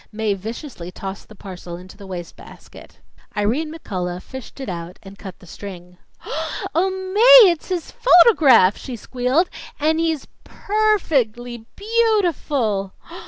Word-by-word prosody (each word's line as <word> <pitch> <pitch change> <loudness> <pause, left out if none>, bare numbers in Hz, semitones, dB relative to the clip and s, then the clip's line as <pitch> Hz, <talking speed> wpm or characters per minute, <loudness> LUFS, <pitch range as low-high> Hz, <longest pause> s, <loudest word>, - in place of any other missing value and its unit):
Mae 215 -1 -1
viciously 215 - -7
tossed 195 +2 -8
the 215 - -13
parcel 180 -3 -9
into 185 +1 -13
the 200 -2 -12
wastebasket. 175 -2 -11 0.4
Irene 250 +10 0
McCullough 180 - -5
fished 260 +1 -10
it 265 - -6
out 175 0 -6
and 195 0 -13
cut 190 -3 -9
the - - -17
string. 180 0 -10 0.8
"Oh, 365 +4 +2 0.2
Mae, 470 -2 +9
it's 340 +1 -6
his 355 -3 -3
photograph!" 310 - +6
she 255 - -7
squealed. 255 - 0 0.3
"And 315 +2 +1
he's 320 -4 -1 0.2
per 430 +1 +1
fect 250 - 0
ly 240 -2 -9
beau 445 +1 +2
ti 350 - +2
ful!" 215 - -2
240 Hz, 145 wpm, -21 LUFS, -, 0.8 s, Mae